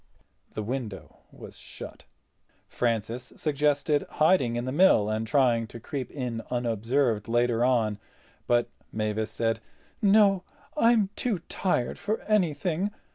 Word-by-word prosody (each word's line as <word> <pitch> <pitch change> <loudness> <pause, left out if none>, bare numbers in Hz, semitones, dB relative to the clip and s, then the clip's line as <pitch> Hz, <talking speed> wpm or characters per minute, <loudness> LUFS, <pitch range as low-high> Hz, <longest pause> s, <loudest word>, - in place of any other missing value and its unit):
The 110 - -2
window 115 -3 -5
was - - -11
shut. - - -10 0.6
Francis 115 +1 -2
suggested 145 0 +1
hiding 155 -7 +3
in 120 +1 -2
the 130 - -2
mill 140 - +4
and 110 +1 -2
trying 120 -3 +2
to 115 - -10
creep 130 +1 -5
in 125 -5 -4
unobserved 120 -1 0
later 120 0 +2
on, 115 -5 +2 0.5
but 120 0 +3 0.2
Mavis 110 0 -2
said: 115 -1 -1 0.4
"No. 200 -2 +5 0.3
I'm 230 -7 +3
too 235 -6 0
tired 175 -10 -1
for 215 +2 -1
anything. 180 -2 0
125 Hz, 125 wpm, -27 LUFS, 115-160 Hz, 0.6 s, No